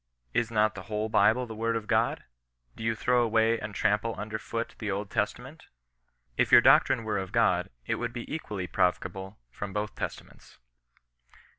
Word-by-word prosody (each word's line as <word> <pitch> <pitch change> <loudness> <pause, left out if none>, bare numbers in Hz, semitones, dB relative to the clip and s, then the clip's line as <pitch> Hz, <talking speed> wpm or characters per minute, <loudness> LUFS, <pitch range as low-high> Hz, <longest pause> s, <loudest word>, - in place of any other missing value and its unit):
Is 115 -1 +1
not 110 -1 +2
the 95 - -8
whole 105 +1 -1
Bible 115 +4 +3
the 115 - -8
word 115 +1 -1
of 115 -2 -3
God - - +1
1 - - -28 0.5
Do - - -7
you 115 0 +1
throw 125 +3 +2
away 115 0 +2
and 105 -1 -7
trample 110 +2 +1
under 110 +1 -4
foot 115 +1 -4
the 110 - -3
Old 100 0 -3
Testament 125 +8 -3
1 - - -39 0.6
If - - +2
your - - +10
doctrine 115 - +5
were 110 -2 -1
of 95 -1 -5
God, - - +2 0.2
it - - -1
would 120 -1 -3
be 120 0 -6
equally 105 - -4
pioveable 95 +2 -1 0.2
from 100 +9 -6
both 105 0 -2
Testaments." - - -8
110 Hz, 185 wpm, -28 LUFS, 105-115 Hz, 0.6 s, your